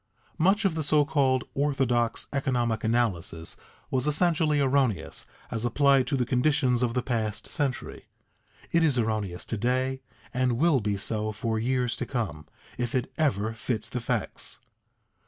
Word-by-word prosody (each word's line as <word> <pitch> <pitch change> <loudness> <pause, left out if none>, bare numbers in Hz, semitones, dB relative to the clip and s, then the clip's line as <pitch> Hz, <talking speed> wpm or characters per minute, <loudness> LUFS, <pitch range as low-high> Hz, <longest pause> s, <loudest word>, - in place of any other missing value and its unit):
Much 195 +6 +3
of 190 - +3
the 160 - -2
so 150 0 +3
called 135 -4 +2
orthodox 135 -5 +1
economic 120 -5 0
analysis 100 -8 0 0.4
was 130 +2 0
essentially 155 -1 +2
erroneous 130 - +1 0.2
as 115 - -2
applied 135 +1 +3
to 140 - 0
the 125 - +1
conditions 125 0 +2
of 120 -1 0
the 125 - +1
past 110 -4 -2
century; 140 -5 -3 0.6
it 170 - +3
is 150 -5 +3
erroneous 110 -6 -1
to 115 - -3
day 130 +4 0 0.3
and 125 -1 +2
will 145 +3 +3
be 100 -1 -1
so 110 +1 -2
for 110 +1 -2
years 125 +1 0
to - - -4
come, 85 - -3 0.3
if 120 0 -1
it 125 - -1
ever 110 -8 +1
fits 115 0 -3
the 125 - -3
facts. - - -2
125 Hz, 155 wpm, -27 LUFS, 110-140 Hz, 0.6 s, Much